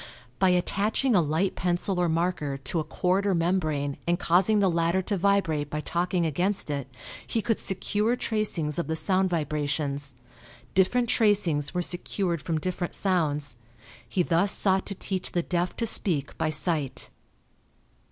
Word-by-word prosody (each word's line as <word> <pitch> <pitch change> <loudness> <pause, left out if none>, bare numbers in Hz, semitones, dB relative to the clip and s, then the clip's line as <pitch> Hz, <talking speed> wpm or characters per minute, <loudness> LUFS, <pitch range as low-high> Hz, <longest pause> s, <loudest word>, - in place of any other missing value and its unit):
By 190 - +4
attaching 205 +7 +1
a 180 - +6
light 160 +5 0
pencil 180 +2 0
or 175 -1 +2
marker 160 -4 -1
to 150 +5 -2
a - - 0
cord 185 +5 0
or 195 - +2
membrane 155 -5 0
and 175 0 +2
causing 185 +6 +3
the 200 - +4
latter 170 +2 +1
to 205 - -1
vibrate 180 -6 +1
by 150 - -3
talking 175 +2 0
against 175 +2 0
it, 140 -2 -3 0.4
he 230 - 0
could 225 0 0
secure 210 +4 0
tracings 190 -11 -1
of 170 - -2
the 160 - -1
sound 190 +3 +1
vibrations. 145 -3 -2 0.6
Different 235 +6 +3
tracings 195 - +2
were 180 - +1
secured 175 -1 -2
from 165 +1 -1
different 180 +1 -3
sounds. 150 -9 0 0.5
He 180 - +1
thus 175 +4 +2
sought 190 -1 +1
to 200 - -4
teach 185 -1 -4
the 175 - +1
deaf 175 +1 -1
to 230 - 0
speak 165 -10 -1
by 155 - 0
sight. 155 -2 -2
175 Hz, 160 wpm, -27 LUFS, 155-195 Hz, 0.6 s, a